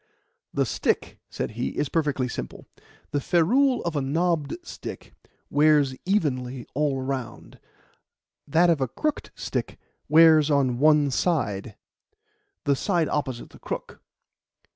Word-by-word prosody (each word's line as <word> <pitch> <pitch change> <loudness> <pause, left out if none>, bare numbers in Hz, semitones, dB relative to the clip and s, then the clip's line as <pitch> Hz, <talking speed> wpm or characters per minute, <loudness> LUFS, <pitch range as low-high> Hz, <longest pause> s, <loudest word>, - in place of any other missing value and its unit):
"The - - +1
stick," - - -1
said - - -4
he, 120 +3 -4
"is 145 - 0
perfectly 145 -4 0
simple. 65 - -7 0.5
The 145 - 0
ferrule 240 - +3
of 170 -2 -3
a 145 - +1
knobbed 160 - 0
stick - - -9 0.4
wears 145 -2 +4
evenly 130 - -1
all 145 -1 0
round; 130 -4 -5 0.9
that 170 +4 +4
of 155 -4 0
a 130 - +1
crooked 305 - -3
stick - - -4 0.3
wears 155 -1 +6
on 135 -4 +2
one 150 -1 +4
side 110 - -1 0.9
the 140 -1 +2
side 170 +1 0
opposite 130 -5 -3
the - - -15
crook. - - -6
145 Hz, 125 wpm, -25 LUFS, 130-165 Hz, 0.9 s, wears